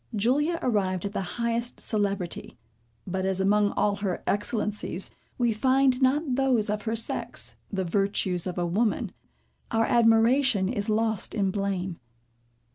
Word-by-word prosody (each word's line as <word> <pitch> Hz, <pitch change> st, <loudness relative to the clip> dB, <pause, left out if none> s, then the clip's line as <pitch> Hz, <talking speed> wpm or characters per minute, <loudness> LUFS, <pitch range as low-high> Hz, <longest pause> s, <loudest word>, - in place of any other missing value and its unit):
Julia 285 Hz, +11 st, +2 dB
arrived 195 Hz, -6 st, 0 dB
at 200 Hz, -, -2 dB
the 205 Hz, -, -2 dB, 0.2 s
highest 235 Hz, 0 st, -1 dB
celebrity; 200 Hz, -, -2 dB, 0.5 s
but 190 Hz, +1 st, -2 dB
as 190 Hz, 0 st, 0 dB
among 205 Hz, +2 st, +3 dB
all 205 Hz, -1 st, +1 dB
her 195 Hz, -3 st, -3 dB
excellencies, 210 Hz, -3 st, -1 dB, 0.3 s
we 240 Hz, -2 st, +2 dB
find 260 Hz, +3 st, +3 dB
not 270 Hz, +2 st, +2 dB
those 250 Hz, -5 st, +2 dB
of 210 Hz, 0 st, -2 dB
her 225 Hz, 0 st, 0 dB
sex, 225 Hz, -, -2 dB, 0.2 s
the 190 Hz, -2 st, -1 dB
virtues 190 Hz, -1 st, 0 dB
of 180 Hz, -, -4 dB
a 175 Hz, -, 0 dB
woman, 210 Hz, +6 st, 0 dB, 0.6 s
our 225 Hz, 0 st, +2 dB
admiration 230 Hz, -1 st, +4 dB
is 210 Hz, -2 st, -2 dB
lost 220 Hz, 0 st, 0 dB
in 195 Hz, -3 st, +1 dB
blame. 190 Hz, -3 st, -2 dB
210 Hz, 140 wpm, -27 LUFS, 195-235 Hz, 0.6 s, admiration